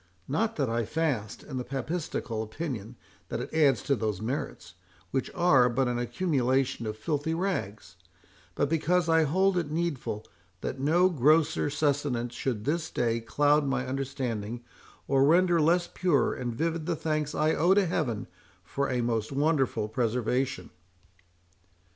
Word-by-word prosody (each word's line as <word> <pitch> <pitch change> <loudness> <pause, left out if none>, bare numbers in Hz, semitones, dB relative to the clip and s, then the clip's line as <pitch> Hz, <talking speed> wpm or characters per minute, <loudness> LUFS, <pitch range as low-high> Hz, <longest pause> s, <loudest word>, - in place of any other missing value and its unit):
Not 220 +10 0
that 140 -3 0
I 115 0 0
fast, 120 -5 -2
in 135 - -6
the 125 - -2
papistical 135 -4 -3
opinion 115 -1 -5 0.3
that - - -3
it - - -6
adds 140 -9 +3
to 140 - +2
those 110 -5 -2
merits, 110 -7 -4 0.4
which 135 - -1
are 135 -8 +5
but 130 +2 +1
an 120 -1 -1
accumulation 130 -2 0
of 105 0 -4
filthy 150 +6 -1
rags; 110 - -3 0.6
but - - +1
because 165 +3 +1
I 160 -1 +4
hold 185 +5 +2
it 160 -4 -3
needful 150 -9 -2 0.4
that - - -4
no 165 +7 +4
grosser 155 0 +3
sustenance 140 -5 0
should 115 -6 -3
this 160 +3 -1
day 115 -1 0
cloud 145 +5 +2
my 130 -1 0
understanding, 125 -4 -3 0.4
or 135 0 +3
render 170 +3 +4
less 175 +3 +3
pure 170 -10 +1
and 125 -1 -3
vivid 165 +3 -2
the 170 - +1
thanks 155 -1 -2
I 155 +1 +2
owe 180 +4 +4
to 200 -1 +4
Heaven 150 -11 -1 0.4
for 140 +11 -2
a 125 -1 0
most 115 -1 -1
wonderful 135 -6 +1
preservation." 120 -1 -1
135 Hz, 150 wpm, -28 LUFS, 120-160 Hz, 0.6 s, are